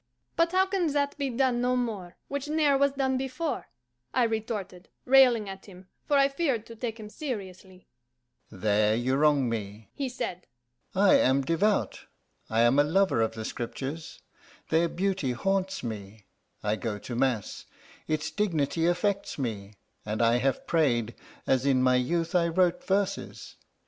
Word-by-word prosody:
"But 335 0 +2
how 375 +1 +4
can 375 -5 0
that 285 -1 0
be 280 -1 0
done 250 -1 +1
no 250 +1 +1
more, 210 -8 -3
Which 280 +1 -4
ne'er 300 -2 +3
was 280 0 +2
done 265 -1 0
before?" 270 +4 -3 0.5
I 250 - +4
retorted, 220 -5 -3 0.2
railing 250 -5 +5
at 195 +1 -9
him, 185 -1 -14 0.2
for 290 - +3
I 275 0 +5
feared 275 -6 -1
to 230 - -11
take 230 0 -5
him 215 - -8
seriously. 190 - -7 0.6
"There 105 +2 +1
you 120 +3 0
wrong 145 -2 +3
me," 105 -1 -5
he 275 -2 -3
said. 180 -7 -5 0.5
"I 195 +1 +5
am 135 +2 +3
devout; 180 +8 0 0.4
I 110 +1 +2
am 120 +4 +4
a - - +7
lover 175 -4 +2
of 110 0 0
the 110 -1 -6
Scriptures 135 +8 -5 0.5
their 165 +1 +2
beauty 185 -8 -1
haunts 190 +7 -1
me; 105 -2 -7 0.4
I 105 +1 0
go 110 -3 -3
to 120 +4 -7
mass 125 -5 -1 0.4
its 155 0 -1
dignity 165 -5 0
affects 195 +3 0
me; 105 -6 -4 0.3
and 105 +1 -3
I 115 0 +4
have 135 +2 -1
prayed, 120 -8 +1 0.3
as 130 -1 +2
in 135 -2 +3
my 130 0 +4
youth 165 +7 -1
I 175 -2 +3
wrote 180 +1 +1
verses. 195 +1 -2
180 Hz, 160 wpm, -28 LUFS, -, 0.6 s, a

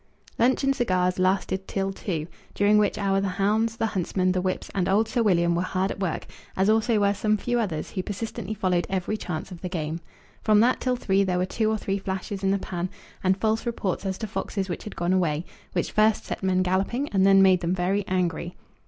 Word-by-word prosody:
Lunch 255 +4 +3
and 275 0 +2
cigars 185 -7 +1
lasted 190 0 0
till 195 0 -2
two, 165 -6 -3 0.3
during 205 +1 +4
which 205 -1 +1
hour 195 -1 +1
the 200 - 0
hounds, 220 +3 +1
the - - +1
huntsmen, 185 -3 0
the 185 0 0
whips, 185 0 -3
and 190 -2 0
old 210 +3 +3
Sir 240 - 0
William 170 -5 +3
were 170 - +1
hard 185 +1 -1
at - - -6
work, 185 -5 -2 0.3
as 195 +3 +4
also 220 0 +2
were 200 0 +3
some 215 +1 +1
few 240 +3 -1
others 185 -9 -2
who 185 - -2
persistently 215 +2 -5
followed 185 -4 0
every 190 +2 -1
chance 180 -3 -5
of 175 - -9
the 180 - -4
game. 160 -2 -3 0.4
From 215 -1 +4
that 245 +3 +3
till 255 -1 0
three 195 -5 +2
there 185 -2 0
were 180 - +1
two 215 +3 0
or 220 - +1
three 200 -1 -2
flashes 190 +1 -4
in 195 - +2
the 195 - +3
pan, 180 -1 -4 0.3
and 190 0 +3
false 220 +2 0
reports 205 -6 -2
as 190 -1 -2
to 220 - -4
foxes 195 -2 -3
which 175 - -5
had 210 - -7
gone 175 +2 0
away, 170 -3 +1 0.3
which 175 - -1
first 215 0 +3
set - - -5
men 185 -1 +2
galloping, 195 +9 0
and 195 -2 +2
then 195 0 +7
made 185 -1 +5
them 175 +1 0
very 190 +3 0
angry. 175 -1 -1
195 Hz, 225 wpm, -25 LUFS, 185-215 Hz, 0.4 s, then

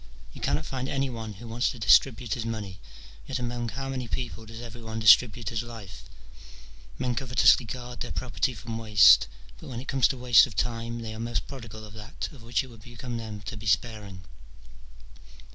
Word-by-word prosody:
Yon - - -11
cannot 155 - 0
find 130 -2 -4
any 135 -1 -1
one 110 -2 -6
who 115 +5 -11
wants 115 +2 0
to 130 - -6
distribute 115 +1 +4
his 120 - -3
money; 105 -5 -5 0.5
yet 130 - -2
among 120 -1 -3
how 135 +4 -5
many 130 -2 -4
people 115 -2 -5
does 110 +1 -9
every 120 0 -9
one 110 -1 -6
distribute 110 0 +5
his 115 -2 -2
life? 105 - -10 0.9
men 125 - -1
covetously 125 0 +4
guard 125 +1 -7
their 120 - -4
property 125 +1 -1
from 115 +2 -6
waste, 105 - +7 0.3
but - - -11
when 120 -2 -5
it 130 - -9
comes 135 -3 +3
to 135 - -3
waste 125 +1 +6
of 115 - -11
time, 115 0 -2
they 110 -1 -5
are 110 - -8
most 115 +1 -2
prodigal 115 -5 -9
of 105 - -13
that 105 -1 -6
of 140 - -14
which 115 -1 0
it - - -11
would 115 -2 -14
become 120 +1 -7
them 110 -2 -7
to 110 +3 -6
be 105 0 -8
sparing. 100 -3 -1
115 Hz, 200 wpm, -27 LUFS, 110-125 Hz, 0.9 s, waste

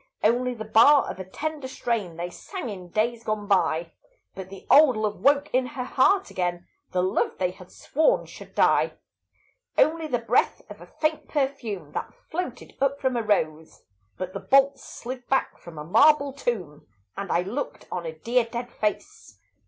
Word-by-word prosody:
Only 245 +3 +2
the 220 -1 -6
bar 250 +7 +6
of - - -10
a - - -4
tender 290 +9 -5
strain 225 -10 -3
They 175 +1 -4
sang 360 - -7
in 185 -4 -8
days 230 +4 0
gone 215 -2 -2
by; 170 -4 +1 0.4
But 190 -1 -8
the 195 -1 -11
old 280 -5 +6
love 215 -1 -2
woke 285 +1 +3
in 255 0 +2
her 250 - -1
heart 375 +10 +2
again, 175 -1 -2 0.3
The 180 0 +1
love 185 - 0
they 180 -1 0
had 180 0 -15
sworn 315 - +1
should - - -13
die. - - +3 0.8
Only 320 0 +3
the 250 - 0
breath 230 0 +1
of - - -11
a - - -12
faint 310 0 -2
perfume 240 - -2
That - - -5
floated 315 -7 -6
up 275 0 +1
from 260 -2 0
a 235 - +1
rose; 160 -7 -1 0.3
But 185 0 -5
the - - -4
bolts 275 +1 +3
slid 250 0 -8
back 270 - 0
from 170 -2 -12
a 150 - -5
marble 280 - +4
tomb, 185 - -4 0.3
And 200 -2 -4
I 170 - +3
looked 235 +10 -5
on 175 -2 -3
a 160 -1 -7
dear 235 +7 +1
dead 235 +1 -6
face. 210 - -4
230 Hz, 180 wpm, -25 LUFS, 185-275 Hz, 0.8 s, bar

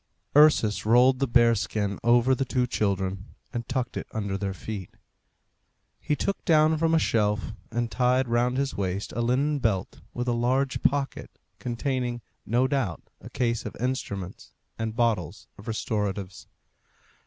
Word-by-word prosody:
Ursus 150 -8 +5
rolled 125 +4 +5
the 135 - +1
bear 120 -1 +5
skin 100 -1 -2
over 120 +2 +4
the 130 - 0
two 125 -1 0
children, 95 -4 -2 0.2
and 120 0 -4
tucked 125 -2 -2
it - - -4
under 100 -3 -3
their 100 0 -2
feet. 95 0 -6 1.1
He 150 - -1
took 200 - -2
down 155 -1 +4
from 165 0 +3
a - - +5
shelf, 105 -7 0 0.2
and 120 0 -2
tied 125 +4 +2
round 120 +2 +1
his 140 -1 0
waist, 95 0 -3
a 120 - 0
linen 140 +5 +1
belt 100 -6 -1
with 125 +1 -4
a - - +2
large 130 +3 0
pocket 140 0 0 0.3
containing, 125 0 -2 0.3
no 120 +3 +2
doubt, 130 - -2
a - - -10
case 115 -2 -1
of - - -7
instruments 100 -7 -4 0.3
and 110 -1 -3
bottles 115 -9 0
of 100 - -12
restoratives. 105 -4 -3
120 Hz, 155 wpm, -26 LUFS, 105-130 Hz, 1.1 s, Ursus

